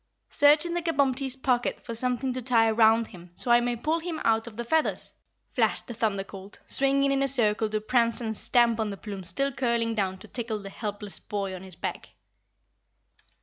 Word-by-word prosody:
"Search 295 +2 +5
in 340 - -3
the 345 - -1
Kabumpty's 275 -5 +1
pocket 250 -2 0
for 235 - -5
something 250 +2 -1
to 255 - -4
tie 230 -2 +3
round 225 +1 +4
him 180 -3 -13
so 240 - -1
I 240 - +7
may 240 0 -1
pull 310 +8 -1
him 330 -1 -5
out 225 0 +2
of 220 -2 -10
the 235 - -3
feathers," 315 +6 0 0.4
flashed - - +1
the 240 - -7
Thunder 210 -3 -1
Colt, 195 +1 -10
swinging 275 0 +2
in 275 0 +1
a 275 - +2
circle 220 -4 +4
to 215 0 -1
prance 230 +2 +1
and 220 -2 -3
stamp 235 0 +2
on 220 -1 0
the 200 - -6
plumes 195 -3 -6
still 275 +10 0
curling 235 -3 0
down 190 -3 -1
to - - -13
tickle 230 -3 -4
the 200 -1 -9
helpless 205 -2 -5
boy 200 -2 -4
on 185 - -7
his 190 -2 -10
back. - - -6
235 Hz, 205 wpm, -27 LUFS, 210-265 Hz, 0.4 s, I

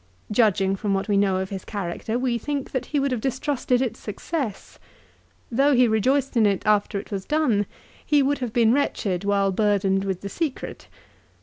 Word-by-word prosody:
Judging 200 -3 +3
from 195 0 -1
what 195 - -2
we 205 - +1
know 195 -1 +3
of 190 +1 -3
his 195 -1 -5
character 205 +3 -3
we 245 -2 0
think 285 +2 -3
that 260 - -3
he 295 - 0
would 275 0 0
have 245 -3 -1
distrusted 260 -1 0
its 245 - -4
success. 225 - -5 0.7
Though 275 +4 +3
he 250 0 +5
rejoiced 260 +6 +1
in 220 -3 +5
it 200 +1 -1
after 210 -1 +2
it 205 - -11
was 195 -2 -3
done 245 -9 +1 0.4
he 295 -2 +3
would 285 +1 +1
have 250 -3 -3
been 230 0 +4
wretched 205 -9 0
while 200 -1 +2
burdened 195 -1 +1
with 190 -2 -3
the 200 - -5
secret. 310 - -4
220 Hz, 190 wpm, -24 LUFS, 200-260 Hz, 0.7 s, he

